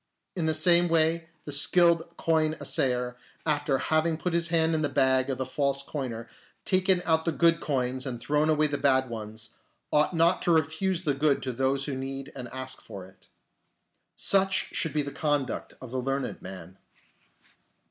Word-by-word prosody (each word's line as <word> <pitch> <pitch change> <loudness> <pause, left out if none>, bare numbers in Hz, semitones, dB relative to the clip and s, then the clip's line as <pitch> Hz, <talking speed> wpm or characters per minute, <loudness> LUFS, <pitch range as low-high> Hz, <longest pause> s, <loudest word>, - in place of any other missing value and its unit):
In 170 -4 -1
the 160 - +3
same 175 +2 +5
way 165 0 +1
the 145 - -7
skilled 170 +3 +5
coin 155 -1 +1
assayer, 125 -1 0 0.3
after 145 -3 +1
having 155 +3 0
put 175 +1 -3
his 170 0 +1
hand 165 -1 +2
in 160 - 0
the 145 - 0
bag 130 -1 +2
of 135 - -2
the 130 - -3
false 140 +1 -1
coiner, 125 -6 -6 0.4
taken 185 -1 +2
out 160 -1 +2
the 165 - 0
good 165 +1 +3
coins 130 -1 -2
and 120 -2 -5
thrown 150 +5 0
away 155 0 +3
the 145 -1 -2
bad 130 -2 +2
ones, 110 0 -6 0.4
ought 150 +4 +2
not 170 +2 +3
to 175 - +1
refuse 165 +4 0
the 150 -4 0
good 140 0 +1
to 130 - -3
those 135 +2 -1
who 145 - -4
need 135 +2 -6
and 125 -2 -7
ask 130 +1 -6
for 95 -2 -10
it. 95 0 -20 0.9
Such 195 -1 +1
should 160 - -1
be 150 -1 0
the 140 - -6
conduct 145 -2 -2
of 130 -3 -10
the 130 0 -2
learned 135 0 -3
man. 95 0 -10
145 Hz, 180 wpm, -27 LUFS, 130-165 Hz, 0.9 s, same